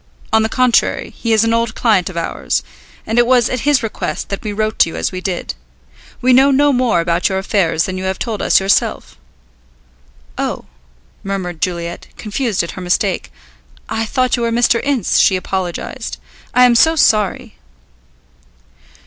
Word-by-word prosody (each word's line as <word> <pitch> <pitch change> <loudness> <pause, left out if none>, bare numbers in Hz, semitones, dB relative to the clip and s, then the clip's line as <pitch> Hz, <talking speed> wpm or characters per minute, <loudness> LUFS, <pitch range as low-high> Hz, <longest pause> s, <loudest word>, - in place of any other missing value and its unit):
On 220 - +5
the 220 - 0
contrary, 250 0 +1
he 230 - -3
is 220 0 +4
an 225 0 +1
old 230 -1 0
client 205 -7 +2
of 180 - -8
ours, 165 - -2 0.4
and 225 +2 +1
it 240 - +4
was 245 -2 +3
at 255 - -1
his 275 -5 +3
request 225 - -4
that 200 - -4
we 210 - -4
wrote 215 +1 -2
to - - +5
you - - -8
as - - -2
we 185 -1 -5
did. 185 -2 -3 0.7
We 255 +1 +4
know 265 +2 +6
no 285 +1 +3
more 245 -8 +2
about 170 +2 0
your 190 - -1
affairs 190 -5 +1
than 185 -1 -4
you 190 - -4
have 190 0 -2
told 220 -4 -4
us - - +4
yourself." 195 +1 0 1.2
"Oh," - - -3 0.6
murmured 185 -4 -4
Juliet, 170 -1 -3
confused 215 -2 -2
at 170 - -5
her 185 - -8
mistake. 180 - -1 0.6
"I 225 0 -1
thought 255 +1 +1
you 240 - -4
were 230 0 0
Mr. 235 0 +2
Ince," 275 -8 +1
she 190 - +4
apologized; 185 -1 -4 0.4
"I 250 - +7
am 245 - +5
so 320 +8 +4
sorry." 215 - +1
215 Hz, 175 wpm, -17 LUFS, 185-240 Hz, 1.2 s, I